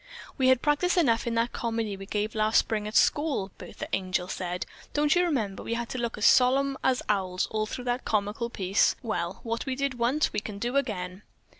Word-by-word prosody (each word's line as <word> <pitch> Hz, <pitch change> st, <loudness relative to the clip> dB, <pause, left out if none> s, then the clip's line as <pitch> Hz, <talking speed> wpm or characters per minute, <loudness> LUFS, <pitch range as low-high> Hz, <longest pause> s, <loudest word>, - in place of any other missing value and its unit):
"We 260 Hz, -, +2 dB
had 260 Hz, -1 st, +4 dB
practice 305 Hz, +5 st, +2 dB
enough 235 Hz, -9 st, +3 dB
in 230 Hz, -, -1 dB
that 230 Hz, +1 st, +1 dB
comedy 225 Hz, -3 st, -2 dB
we 195 Hz, 0 st, -9 dB
gave 210 Hz, +1 st, -2 dB
last 215 Hz, 0 st, +2 dB
spring 210 Hz, -1 st, +1 dB
at 215 Hz, -, -6 dB
school," 285 Hz, -11 st, +2 dB
Bertha -, -, -7 dB
Angel 185 Hz, -1 st, 0 dB
said. 180 Hz, -1 st, -3 dB, 0.3 s
"Don't 295 Hz, 0 st, +3 dB
you 355 Hz, -, +4 dB
remember 230 Hz, -, -1 dB
we 230 Hz, -, -3 dB
had 235 Hz, 0 st, -3 dB
to 255 Hz, -, -4 dB
look 235 Hz, -1 st, -2 dB
as 215 Hz, -, 0 dB
solemn 270 Hz, +2 st, +5 dB
as 260 Hz, -1 st, +2 dB
owls 185 Hz, -3 st, 0 dB
all 215 Hz, 0 st, -1 dB
through 250 Hz, -, -5 dB
that 245 Hz, +1 st, -1 dB
comical 210 Hz, +3 st, -1 dB
piece? 195 Hz, -3 st, +2 dB
Well, 175 Hz, -5 st, -3 dB
what 230 Hz, +2 st, -3 dB
we 260 Hz, -, -1 dB
did 275 Hz, -2 st, -2 dB
once, 255 Hz, +6 st, +1 dB
we 210 Hz, -, 0 dB
can 205 Hz, -1 st, -7 dB
do 240 Hz, +5 st, -2 dB
again." 190 Hz, -8 st, -2 dB
230 Hz, 210 wpm, -27 LUFS, 205-260 Hz, 0.3 s, solemn